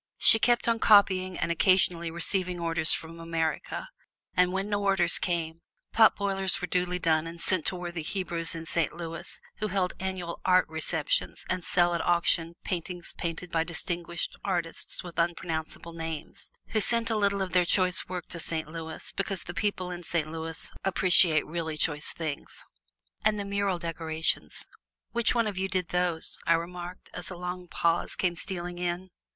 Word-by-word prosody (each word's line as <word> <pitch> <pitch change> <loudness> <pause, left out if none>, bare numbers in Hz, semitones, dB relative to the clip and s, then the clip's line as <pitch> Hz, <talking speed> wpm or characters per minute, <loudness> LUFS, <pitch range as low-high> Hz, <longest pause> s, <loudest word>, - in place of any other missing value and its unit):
She 225 - +11
kept 240 +1 +3
on 230 -1 +2
copying 185 -4 +4
and - - -1
occasionally 170 -1 +3
receiving 180 +2 -1
orders 165 -1 +1
from 165 +1 -2
America; 165 - -2 0.5
and 180 0 +4
when 195 +2 -1
no 205 -1 -1
orders 195 -3 +3
came, 165 -2 -2 0.3
potboilers 200 -4 +3
were - - -2
duly 180 0 0
done 165 -2 +1
and 170 +1 -8
sent 180 -1 0
to - - -1
worthy 175 -1 -5
Hebrews 170 -1 -2
in 165 0 -6
Saint 165 -2 0
Louis 165 -1 -6 0.2
who 215 - -1
hold 185 -2 0
annual 185 -2 -4
Art 185 0 +4
Receptions 160 -1 0
and 185 -1 -2
sell 175 0 +2
at 170 - 0
auction 170 -1 +2
paintings 175 -1 -3
painted 170 +1 -4
by 165 -1 +2
distinguished 170 0 -3
artists 175 -4 -2
with 175 -2 -7
unpronounceable 165 -1 -2
names, 165 -1 -7 0.2
who 220 - +1
send 230 +2 +4
a - - +1
little 200 -2 +2
of 185 - -5
their 180 +1 +4
choice 185 +1 +3
work 180 -2 -5
to 170 - -6
Saint 160 -1 -2
Louis, 160 -1 -6
because 195 -3 -2
the 175 - -7
people 185 0 -2
in 175 0 -6
Saint 160 -2 -1
Louis 165 0 -4
appreciate 180 -4 +4
really 160 -1 -4
choice 150 -1 0
things. 155 -3 -6 0.6
"And 215 -1 +2
the 200 - -3
mural 200 -2 0
decorations 160 -2 -1 0.5
which 235 +1 +2
one 230 -1 +3
of 205 -3 -3
you 190 0 -1
did 185 -2 -1
those?" 180 -2 0
I 165 - +6
remarked, 175 +2 -5
as 180 - -6
a 180 - -7
long 180 0 -5
pause 170 0 0
came 175 -2 0
stealing 175 -1 -3
in. 180 +1 -3
175 Hz, 170 wpm, -28 LUFS, 165-185 Hz, 0.6 s, She